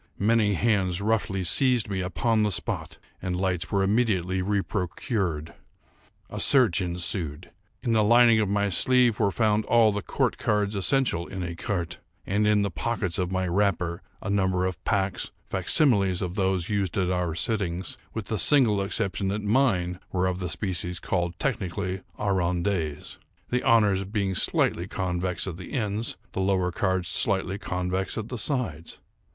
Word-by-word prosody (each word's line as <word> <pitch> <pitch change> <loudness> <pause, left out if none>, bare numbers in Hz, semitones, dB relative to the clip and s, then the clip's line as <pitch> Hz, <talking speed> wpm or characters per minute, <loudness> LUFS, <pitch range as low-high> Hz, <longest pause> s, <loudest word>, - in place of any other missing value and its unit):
Many 105 -1 +2
hands 95 -4 +1
roughly 100 -2 0
seized 125 +5 +2
me 95 -2 -2
upon 110 +5 0
the 105 - +2
spot, 85 -3 -2 0.2
and 90 -1 -2
lights 95 -2 -1
were 100 -1 +2
immediately 95 -4 +1
reprocured. 95 - -2 0.7
A - - -6
search 115 -12 +4
ensued. 85 -2 -1 0.3
In 120 -3 +1
the 110 -1 +4
lining 115 +1 +6
of 105 -3 +1
my 100 0 +1
sleeve 125 +3 +3
were 100 -3 +3
found 110 +1 +1
all 115 -2 +4
the 105 0 -3
court 85 - -1
cards 105 -1 0
essential 100 -4 +1
in 95 - -6
écarté, 85 0 -3 0.3
and, 105 +2 +1
in 105 -1 +3
the 100 - -2
pockets 95 +2 -2
of 90 0 -1
my 95 -1 -1
wrapper, 90 -2 0 0.2
a - - -4
number 95 -2 +1
of 95 -1 -4
packs, 95 -1 -1 0.2
facsimiles 100 - +2
of 90 -1 -3
those 95 -3 0
used 100 -4 -1
at 90 -2 +1
our 90 -3 -1
sittings, 90 -2 -2 0.2
with - - -5
the - - -3
single 120 -9 +4
exception 95 0 -1
that 105 +2 -2
mine 100 -6 +1
were 90 0 0
of 90 0 -1
the 90 -2 -3
species 90 0 -3
called, 85 +1 -2
technically, 95 -6 -2 0.2
arrondees; 90 -5 -1 0.3
the 125 +1 0
honours 105 -4 +4
being 100 -1 -2
slightly 90 -1 +2
convex 90 -2 -2
at 90 -4 -5
the 90 - -9
ends, 110 -3 -1
the 95 - -3
lower 95 -2 +1
cards 95 -1 -1
slightly 95 +3 +2
convex 90 +1 -2
at 110 0 -4
the 125 - -4
sides. 100 - -2
95 Hz, 160 wpm, -26 LUFS, 90-105 Hz, 0.7 s, lining